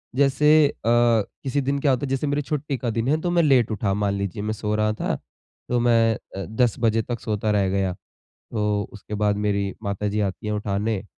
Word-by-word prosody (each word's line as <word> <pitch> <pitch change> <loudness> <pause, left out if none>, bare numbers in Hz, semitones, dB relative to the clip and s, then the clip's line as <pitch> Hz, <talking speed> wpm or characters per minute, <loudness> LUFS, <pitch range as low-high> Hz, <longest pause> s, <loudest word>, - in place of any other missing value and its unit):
जैसे 145 +3 +5
अ, - - -5
किसी 120 +3 +2
दिन 140 +1 -1
क्या 140 0 +2
होता 130 +2 0
है, - - -5
जैसे 135 +2 -1
मेरी 145 +1 0
छुट्टी 150 -1 -3
का 120 - -3
दिन 115 +1 -1
है 155 +3 +2
तो 175 - -1
मैं 175 -1 +3
लेट 130 -7 +4
उठा 100 -2 0
मान 100 0 0
लीजिए 100 -1 -3
मैं 110 +1 -1
सो 105 0 -3
रहा 110 0 +1
था 110 - -2 0.5
तो 125 - +2
मैं 115 -1 +4 0.2
अ, 95 -1 -4
10 110 +4 +1
बजे 115 -1 +2
तक 120 +1 -4
सोता 105 -1 -1
रह 100 -2 +2
गया। 95 -1 0 0.4
तो 105 -2 -2
उसके 105 0 -9
बाद 105 0 +1
मेरी 100 -1 0
माताजी 100 +1 -2
आती 100 +1 -3
हैं 105 - -1
उठाने, 105 0 -1
110 Hz, 215 wpm, -23 LUFS, 105-130 Hz, 0.5 s, जैसे